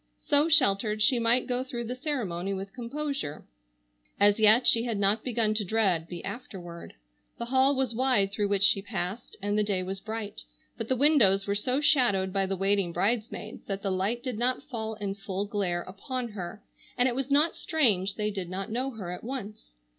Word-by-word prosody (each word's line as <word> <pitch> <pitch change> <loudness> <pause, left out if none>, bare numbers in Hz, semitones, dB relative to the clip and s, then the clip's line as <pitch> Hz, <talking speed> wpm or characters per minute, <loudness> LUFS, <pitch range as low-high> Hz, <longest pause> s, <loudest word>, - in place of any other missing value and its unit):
So 290 +3 +3
sheltered 210 -7 +3
she 240 +3 +4
might 235 +2 +3
go 250 0 -2
through 250 -3 -5
the 235 +2 -4
ceremony 200 - -3
with 195 +1 -7
composure. 275 - -5 0.7
As 205 +1 +4
yet 220 +3 +6
she 230 - +6
had 230 -3 -2
not 200 +2 +2
begun 230 -3 +1
to 215 0 0
dread 190 -5 +1
the 175 -1 -8
afterward. 175 -8 -8 0.4
The 235 - -4
hall 265 +3 +3
was 260 -3 0
wide 225 -5 +2
through 205 0 -1
which 200 -1 +1
she 200 -1 +5
passed, 195 +2 -5
and 205 0 0
the 210 - +2
day 195 -3 -1
was 190 +1 -5
bright, 220 0 -6 0.3
but 225 - -5
the 260 - +1
windows 235 -9 +4
were 200 - -1
so 250 +7 0
shadowed 235 -11 +3
by 195 -1 0
the 195 0 -2
waiting 195 -1 +1
bridesmaids 215 +6 -2
that 195 0 -4
the 195 - -1
light 200 +6 -1
did 250 -5 -4
not 250 +1 0
fall 220 -5 -5
in 205 -2 -4
full 195 0 -4
glare 190 -4 -2
upon 240 +6 -5
her, 205 0 -8 0.3
and 245 - +3
it 250 - 0
was 270 +2 -3
not 295 +4 +3
strange 205 - +1
they 210 -1 -2
did 190 -4 -5
not 190 +3 -5
know 255 +4 -1
her 205 -8 -7
at 180 - -7
once. 220 -4 -7
215 Hz, 200 wpm, -28 LUFS, 195-250 Hz, 0.7 s, yet